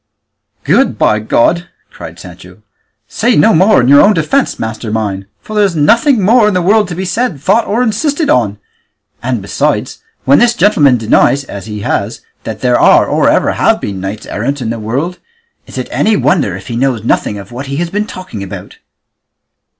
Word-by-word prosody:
"Good, - - +1
by 110 - +2
God!" 120 +10 0 0.2
cried - - -10
Sancho; - - -13 0.4
"say 235 +1 0
no 225 - +4
more 190 +6 +4
in 120 - 0
your 140 +1 +6
own 210 0 +4
defence, 210 - 0
master 110 0 -5
mine, 100 -3 -3
for 215 - -9
there's 200 -4 +1
nothing 230 - +3
more 220 +2 +4
in 210 - 0
the 180 - +1
world 210 +3 +3
to 175 - -6
be 190 +2 -4
said, 205 - -2
thought, 195 - +1
or 230 +4 0
insisted 285 +7 -1
on; 105 -5 +1 0.6
and 120 -4 -3
besides, 100 - -2 0.2
when 140 - +4
this 240 0 +3
gentleman 150 - +3
denies, 120 +5 +2
as 100 -6 -9
he 105 -1 -6
has, - - -3 0.2
that - - -6
there - - +2
are - - +5
or - - +1
ever - - +2
have - - +1
been 100 - -5
any 95 +2 -3
knights 110 - -15
errant 140 +7 -3
in 115 -3 -3
the 115 - -5
world, 135 +12 -3 0.5
is - - -10
it - - -4
any 215 -1 +1
wonder 145 - 0
if 95 - -10
he 120 - -6
knows 125 -3 -1
nothing 105 -2 -1
of 100 +2 -11
what 130 +3 -7
he 140 - -4
has 170 +3 -3
been 210 +1 -2
talking 185 - -8
about?" 100 - -9
145 Hz, 195 wpm, -12 LUFS, -, 0.6 s, your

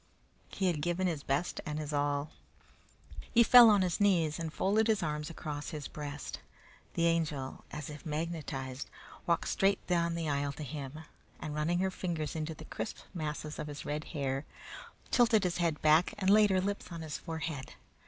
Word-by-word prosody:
He 195 - -2
had 170 -5 +1
given 175 +4 0
his 165 -5 -1
best 140 +6 -1
and 150 -1 -4
his 155 -1 -4
all. 145 +1 0 1.0
He 235 - +7
fell 240 0 +10
on 205 -3 +5
his 180 +2 -1
knees 170 -6 +3
and 165 -1 -3
folded 210 +7 +2
his 220 -2 +2
arms 150 +1 -2
across 150 -3 -5
his 150 -3 -5
breast. 145 -2 -6 0.6
The 170 - +2
Angel, 155 -5 0
as 150 -2 -6
if 150 -1 -8
magnetized, 150 -5 -4 0.4
walked 170 -1 +2
straight 195 +1 +2
down 170 -1 +1
the 165 -1 -2
aisle 140 -1 0
to 155 - -7
him, 145 +1 -6 0.4
and 150 - -5
running 155 +3 +1
her 190 0 +1
fingers 165 -5 -3
into 160 0 -3
the 155 - -10
crisp - - -5 0.2
masses 155 -2 -4
of - - -3
his 145 0 -7
red 150 +1 -3
hair, 135 -3 -2 0.7
tilted 230 -4 +5
his 180 -2 0
head 165 -3 +1
back 155 +3 +5
and 195 -1 +2
laid 210 0 +7
her 190 -1 +3
lips 200 -1 -3
on 170 -1 -5
his 155 -2 -5
forehead. 160 -4 -5
160 Hz, 185 wpm, -32 LUFS, 150-180 Hz, 1.0 s, fell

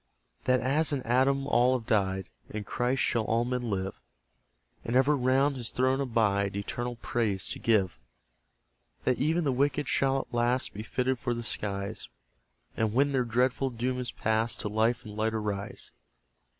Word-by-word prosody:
That 130 0 +3
as 150 +5 +2
in 140 -3 -1
Adam 135 +3 +2
all 125 -1 +3
have 115 - -10
died, 95 -4 0 0.2
In 105 0 -5
Christ 125 +5 0
shall 115 - +1
all 115 +2 +1
men 125 -1 -2
live; 95 -1 -3 0.8
And 115 - -2
ever 135 +3 +4
round 135 +2 +2
his 120 -3 -3
throne 130 +2 +1
abide, 100 -6 +1
Eternal 120 +4 -3
praise 105 -5 0
to - - -4
give. 105 -6 +1 1.0
That 125 - +1
even 160 +5 +2
the 140 - +1
wicked 140 +2 +1
shall 135 0 +2
at 135 - -5
last 120 +2 +1
Be 105 - -6
fitted 125 +3 -1
for 120 -2 -1
the 120 - -4
skies; 100 -3 -2 0.7
And 110 -1 0
when 140 +4 +3
their 130 -2 +2
dreadful 125 +3 +1
doom 125 +1 -2
is 125 -1 -4
past, 110 +1 0
To 105 - -2
life 115 +3 +1
and 105 -1 -8
light 110 +1 0
arise. 105 -2 -4
120 Hz, 170 wpm, -29 LUFS, 110-130 Hz, 1.0 s, ever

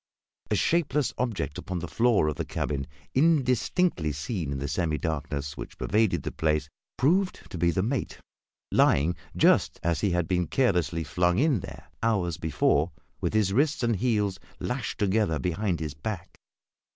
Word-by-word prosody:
A 105 - +2
shapeless 150 - +1
object 115 - -2
upon 90 - -4
the 90 0 -4
floor 115 -5 +3
of 75 - -1
the - - -1
cabin, 70 -2 -3 0.3
indistinctly 135 - +2
seen 75 - -3
in 70 - -2
the 70 +1 -3
semi 80 +1 0
darkness 75 -3 -3
which - - -8
pervaded 110 -1 +1
the - - -3
place, 75 -1 0 0.3
proved 180 +8 +2
to - - -5
be 85 +1 +3
the 90 +3 +1
mate, 125 +4 -2 0.5
lying 80 +5 +4 0.2
just - - +4
as 85 -3 0
he 100 - +2
had 90 -2 0
been 90 -1 +1
carelessly 85 - +1
flung 90 +4 +1
in 140 -4 +3
there, - - -9 0.2
hours 95 -8 +1
before, 80 0 +2 0.3
with - - -1
his 100 -3 +2
wrists 145 +3 +2
and 115 -3 +2
heels 105 -4 0 0.2
lashed 125 -2 -3
together 100 -5 +1
behind 90 0 -1
his 75 -2 -4
back. 85 +5 -6
90 Hz, 165 wpm, -27 LUFS, 80-120 Hz, 0.5 s, lying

